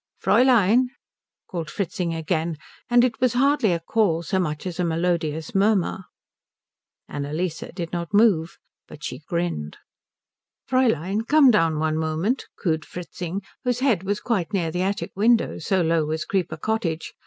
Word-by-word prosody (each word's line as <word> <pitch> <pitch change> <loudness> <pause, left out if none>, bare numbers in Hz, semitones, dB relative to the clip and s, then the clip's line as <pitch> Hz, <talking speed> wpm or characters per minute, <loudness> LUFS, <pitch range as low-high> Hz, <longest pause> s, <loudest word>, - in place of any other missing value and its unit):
"Fräulein," 245 -1 +4 0.6
called 165 -4 -5
Fritzing 180 0 -2
again; 160 0 -2 0.3
and 240 0 +5
it 245 -2 0
was 255 -2 +3
hardly 265 -4 +3
a 170 - 0
call 170 -2 +1
so 190 +2 0
much 155 -3 -2
as 180 -1 -5
a - - +2
melodious 165 -2 -1
murmur. 195 -2 +1 1.0
Annalise 155 +4 -3 0.2
did 170 -2 -5
not 170 -1 -3
move, 205 -6 +3 0.3
but 150 - -12
she 125 - -5
grinned. 165 - -3 0.9
"Fräulein, 225 - +1
come 295 -4 +6
down 165 -7 +2
one 155 0 0
moment," 160 +11 -1
cooed 160 -3 0
Fritzing, 180 +2 -6 0.2
whose 250 0 0
head 240 -10 +2
was 200 +2 -2
quite 210 -5 -1
near 170 -5 0
the 180 +2 -2
attic 195 +2 -2
window 225 +4 +2
so 190 -4 +1
low 165 -1 +2
was 155 0 -2
Creeper 175 -4 -1
Cottage. 170 -4 -2
180 Hz, 150 wpm, -24 LUFS, 160-220 Hz, 1.0 s, come